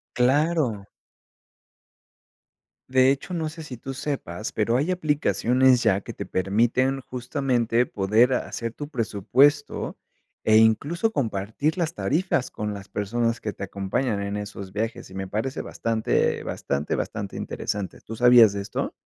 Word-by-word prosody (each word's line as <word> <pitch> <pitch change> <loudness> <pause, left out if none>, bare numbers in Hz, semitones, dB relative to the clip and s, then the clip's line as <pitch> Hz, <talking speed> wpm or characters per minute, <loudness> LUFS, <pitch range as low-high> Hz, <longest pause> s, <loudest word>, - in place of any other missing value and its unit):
Claro. 130 -5 +2 2.0
De 130 0 +5
hecho, 140 +6 -1
no 160 -2 -1
sé 160 0 -9
si 125 -5 -8
tú 135 +2 -7
sepas, 110 - -4
pero 115 +3 +1
hay 155 +7 0
aplicaciones 130 -6 +2
ya 100 -3 +2
que - - -8
te - - -7
permiten, 120 +8 +1
justamente, 125 -2 0
poder 110 +6 +3
hacer 115 -2 -3
tu 145 - -6
presupuesto 130 +5 +1 0.5
e 110 0 +5
incluso 145 - +3
compartir 115 - -1
las 170 0 -1
tarifas 155 -4 0
con 105 -1 -4
las 100 0 -9
personas 115 +3 -1
que 105 - -3
te 100 - -8
acompañan 100 +3 -2
en 100 +1 -3
esos 100 -2 -7
viajes 110 0 -4
y 95 - -12
me 95 0 -4
parece 110 +7 -3
bastante, 115 -1 0
bastante, 70 +2 -2
bastante 100 -3 -3
interesante, 100 -2 -4
¿tú 115 - -8
sabías 120 -3 +7
de 100 - -3
esto? 100 - -3
120 Hz, 140 wpm, -25 LUFS, 105-135 Hz, 2.0 s, sabías